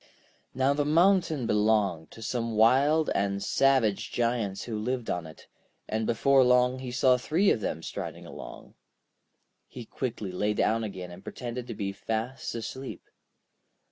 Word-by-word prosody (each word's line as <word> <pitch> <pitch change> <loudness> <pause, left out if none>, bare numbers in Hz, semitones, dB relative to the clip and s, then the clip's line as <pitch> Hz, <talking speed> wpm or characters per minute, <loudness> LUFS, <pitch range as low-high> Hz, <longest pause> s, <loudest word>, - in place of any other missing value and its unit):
Now 135 +2 +3
the 145 +1 0
mountain 165 -2 +3
belonged 105 -7 +1
to 115 - -11
some 115 -1 -2
wild 140 +8 +4
and 100 0 -1
savage 130 -5 +2
Giants 115 -5 -1
who 115 - -5
lived 125 +2 -2
on 85 -2 -3
it, 80 - -14 0.4
and 110 0 -2
before 135 +3 +4
long 125 +1 +3
he 130 -1 -6
saw 125 +1 +4
three 165 +10 +2
of 110 - 0
them 80 - -3
striding - - -6
along. - - -10 0.9
He 120 -2 -9
quickly 110 -6 -4
lay 105 +3 -1
down 115 +2 +1
again 95 -4 -6
and 90 +2 -12
pretended 120 +3 -6
to 115 - -6
be 100 -1 -3
fast 110 +6 -4
asleep. 130 +3 -6
115 Hz, 150 wpm, -28 LUFS, 105-130 Hz, 0.9 s, wild